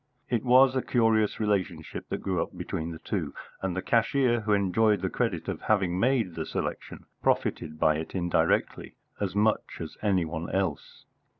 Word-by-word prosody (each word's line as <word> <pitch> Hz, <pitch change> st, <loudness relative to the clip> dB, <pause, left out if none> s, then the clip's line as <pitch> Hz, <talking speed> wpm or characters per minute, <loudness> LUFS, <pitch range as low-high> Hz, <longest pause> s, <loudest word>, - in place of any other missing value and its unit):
It 120 Hz, -3 st, +1 dB
was 130 Hz, +1 st, +6 dB
a 130 Hz, -, +2 dB
curious 110 Hz, -4 st, +2 dB
relationship 95 Hz, -7 st, -2 dB
that -, -, -4 dB
grew 95 Hz, -3 st, 0 dB
up -, -, -5 dB
between 80 Hz, +1 st, -4 dB
the 80 Hz, -, -6 dB
two, 80 Hz, -3 st, -4 dB, 0.3 s
and 95 Hz, -2 st, -2 dB
the 95 Hz, -, -2 dB
cashier, 120 Hz, +1 st, +2 dB
who 105 Hz, -1 st, -2 dB
enjoyed 100 Hz, +1 st, +3 dB
the 95 Hz, -, -1 dB
credit -, -, -1 dB
of -, -, -4 dB
having 95 Hz, -4 st, +1 dB
made 115 Hz, -6 st, +2 dB
the 80 Hz, -1 st, -4 dB
selection, -, -, -5 dB, 0.2 s
profited 80 Hz, 0 st, 0 dB
by 75 Hz, -1 st, +3 dB
it 80 Hz, +4 st, -6 dB
indirectly 85 Hz, -2 st, 0 dB, 0.2 s
as 100 Hz, -2 st, -2 dB
much 105 Hz, +1 st, +1 dB
as 80 Hz, -, -7 dB
any 95 Hz, -5 st, +2 dB
one 80 Hz, +1 st, -5 dB
else. 95 Hz, -6 st, -3 dB
95 Hz, 175 wpm, -28 LUFS, 85-110 Hz, 0.3 s, was